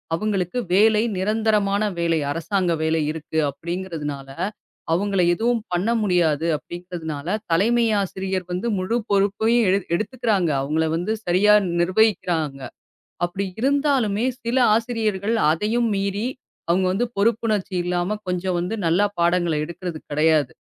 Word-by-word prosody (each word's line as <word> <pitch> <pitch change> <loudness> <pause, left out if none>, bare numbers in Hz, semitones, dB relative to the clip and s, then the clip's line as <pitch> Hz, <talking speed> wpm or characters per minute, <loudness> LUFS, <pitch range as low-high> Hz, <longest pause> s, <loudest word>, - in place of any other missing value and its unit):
அவுங்களுக்கு 195 +1 -2 0.2
வேலை 215 +2 +5 0.2
நிரந்தரமான 210 0 +1 0.2
வேலை. 165 -1 +1 0.2
அரசாங்க 175 +2 -1
வேலை 160 0 +1
இருக்கு 160 0 -6
அப்டிங்கறதுனால 160 -5 -5 0.6
அவுங்கள 195 +1 +1
எதுவும் 235 +5 +1
பண்ண 180 +6 0
முடியாது 170 -6 +2
அப்டிங்கறதுனால 170 0 -5 0.2
தலைமை 230 +8 +3 0.2
ஆசிரியர் 190 -1 -3
வந்து 180 +6 -2
முழு 185 +5 -1 0.2
பொறுப்பையும் 210 +4 +2
எடு 190 - +4 0.2
எடுத்துக்குறாங்க. 215 -4 0
அவுங்கள 155 +3 0
வந்து 175 +6 -2
சரியா 190 +4 +4 0.3
நிர்வகிக்கிறாங்க. 175 -7 +1 0.7
அப்டி 190 +3 -4
இருந்தாலுமே 265 -6 +1 0.2
சில 235 +2 -1 0.2
ஆசிரியர்கள் 220 -2 -1 0.2
அதையும் 220 +8 +1
மீறி 200 +3 -1 0.4
அவுங்க 185 +2 +2
வந்து 240 +6 0
பொறுப்புணர்ச்சி 210 -2 0
இல்லாம 180 +4 -1
கொஞ்சம் 180 0 -1
வந்து 180 +6 -2
நல்லா 180 +5 +3
பாடங்கள 175 -1 +2
எடுக்குறது 170 0 -6
கெடையாது. 150 -2 +2
190 Hz, 115 wpm, -22 LUFS, 170-215 Hz, 0.7 s, வேலை